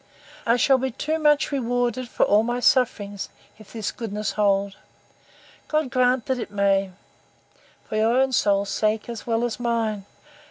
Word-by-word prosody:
—I 235 +1 +4
shall 265 +1 +4
be 265 +1 -1
too 310 +6 -2
much 300 -1 +3
rewarded 245 -1 -1
for - - +1
all 205 +1 +4
my 240 +2 -2
sufferings, 230 -8 +1 0.3
if 215 - -15
this 220 -3 -3
goodness 210 -3 -4
hold! 200 -1 +1 0.9
God 305 -4 -1
grant 250 -1 +2
it 245 -4 -2
may, 200 -1 +1 1.0
for 215 - -3
your 225 +3 +2
own 265 0 +2
soul's 200 -4 +2
sake 215 +1 0
as 235 -1 -7
well 230 0 0
as 240 0 -2
mine. 225 -4 -1
230 Hz, 155 wpm, -24 LUFS, 210-255 Hz, 1.0 s, I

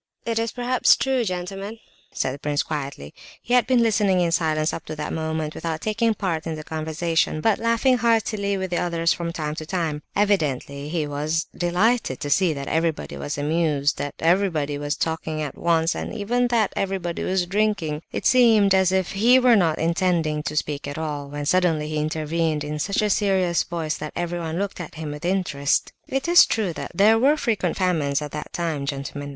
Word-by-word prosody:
"It 230 -1 0
is 230 0 -1
perhaps 245 +1 +3
true, 265 -2 0
gentlemen," 195 +2 -4 0.3
said 130 - -2
the 140 - -8
prince, 145 0 0
quietly. 140 - -5 0.3
He 245 - -4
had 250 -1 +4
been 255 -2 +4
listening 205 -4 +2
in 170 -1 +1
silence 155 -1 +1
up - - -5
to 155 - -6
that 150 0 -4
moment 160 -1 -2
without 165 -1 -4
taking 225 +1 +1
part 170 -6 -2
in 160 - -3
the 155 - -7
conversation, 160 +1 -1
but 220 +5 +2
laughing 230 +3 +2
heartily 215 -3 +1
with 190 -1 -4
the 175 - 0
others 170 -1 +1
from 170 -1 -4
time 155 -2 -3
to 155 0 -6
time. 160 -5 -2
Evidently 150 -8 0
he 160 -2 -1
was 150 +3 -1
delighted 180 - +1
to 145 - -4
see 185 0 +3
that 140 -2 -5
everybody 160 -1 -1
was 145 +1 -4
amused, 150 -1 0
that 145 - -4
everybody 165 -4 +1
was 145 +1 -2
talking 160 -1 -2
at 150 -3 -4
once, 165 0 +1
and - - -5
even 240 +4 0
that 230 -4 +1
everybody 190 -3 -2
was 185 -1 0
drinking. 190 -6 0
It - - -4
seemed 225 -6 +5
as 190 -1 +3
if 190 -1 0
he 235 +6 +5
were 250 -2 +5
not 165 -6 +2
intending 165 -2 0
to 150 - -7
speak 145 -1 -2
at 145 - -5
all, 150 -3 -4
when 145 0 -5
suddenly 160 -2 +2
he 155 - -2
intervened 155 0 -1
in 150 +1 -4
such 200 +7 0
a 210 - +1
serious 190 -4 +2
voice 165 -2 -3
that 150 0 -6
everyone 170 -1 -3
looked 200 -1 -3
at 165 - -9
him 155 -2 -5
with 150 +3 -7
interest. 170 -7 0
"It 270 +4 -2
is 345 +1 +7
true 205 -6 -1
that - - -6
there 215 +4 +5
were 285 +5 +4
frequent 215 - -1
famines 160 -7 +1
at 150 -1 -6
that 150 0 -6
time, 160 -5 -2
gentlemen. 140 +1 -5
170 Hz, 200 wpm, -23 LUFS, 150-200 Hz, 0.3 s, is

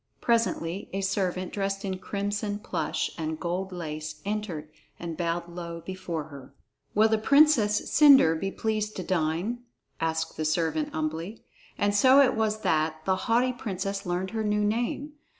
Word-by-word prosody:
Presently 205 -6 0
a 195 - -1
servant 185 -2 -1
dressed 195 0 -2
in 190 -1 -3
crimson 205 +1 -2
plush 210 - -2
and 160 0 -3
golden 180 +2 -3
lace 155 -2 -5
entered 195 -8 -4 0.3
and 170 -1 -5
bowed 170 +1 -2
low 170 -1 -7
before 175 -3 -4
her. 140 -3 -12 0.4
"Will 215 +2 +6
the 220 -1 +1
Princess 260 -5 +4
Cendre 275 - +7
be 195 +4 -2
pleased 215 +1 -2
to 185 - -4
dine?" 175 +7 -1 0.4
asked 160 0 -2
the 155 - -1
servant 155 0 0
humbly, 160 +7 -4 0.3
and 205 0 +1
so 260 +7 +6
it 275 -3 +5
was 215 -1 0
that 155 0 0
the 190 - +2
haughty 250 +2 +3
princess 195 -4 -4
learned 180 +1 -2
her 220 -1 -2
new 210 0 +1
name. 240 +7 -1
190 Hz, 155 wpm, -27 LUFS, 165-215 Hz, 0.4 s, Cendre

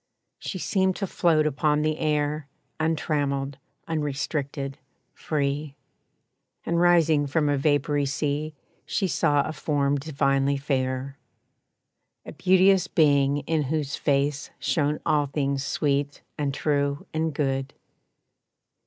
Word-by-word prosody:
She 190 - -5
seemed 190 0 +1
to 200 - -2
float 165 -4 +2
upon 150 +1 +1
the 155 0 0
air, 150 -1 0 0.3
Untrammeled, 145 -3 -1 0.3
unrestricted, 140 -2 -3 0.3
free; 145 -1 -2 0.9
And 170 0 +1
rising 165 -4 +4
from 150 +1 +1
a 145 - +2
vapory 145 0 +1
sea 150 +2 -2 0.3
She 195 - -1
saw 145 -4 +2
a 155 - -4
form 145 -2 0
divinely 140 -1 +1
fair. 135 -1 -2 1.1
A - - -7
beauteous 190 0 +4
being 145 -2 +3
in 160 +2 0
whose 145 0 -2
face 145 0 0
Shone 150 -1 0
all 145 -1 +2
things 140 -1 -1
sweet 140 0 -1
and 145 -2 -1
true 140 0 -1
and 160 0 0
good. 135 -2 -2
145 Hz, 115 wpm, -25 LUFS, 140-155 Hz, 1.1 s, rising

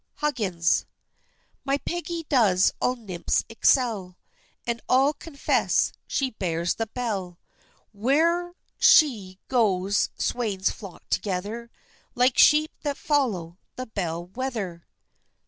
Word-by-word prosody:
HUGGINS. 205 - 0 0.8
My 275 0 +1
Peggy 340 +1 -4
does 200 -9 +3
all 250 - +2
nymphs 195 -8 -2
excel, 225 -6 +1 0.5
And 235 -1 -2
all 270 +3 +4
confess 290 -1 0 0.2
she 265 -2 -1
bears 170 -4 -1
the 225 - -3
bell, 205 -7 -4 0.6
Where'er 330 - +1 0.2
she 210 - +4
goes 200 -5 +1
swains 205 -6 -1
flock 195 -5 -11
together, 205 +5 -2 0.5
Like 250 +1 +3
sheep 305 +1 +6
that 285 -2 -2
follow 200 - -1 0.2
the 255 - -5
bell 175 -6 -4
wether. 195 -5 -5
225 Hz, 105 wpm, -25 LUFS, 185-270 Hz, 0.8 s, sheep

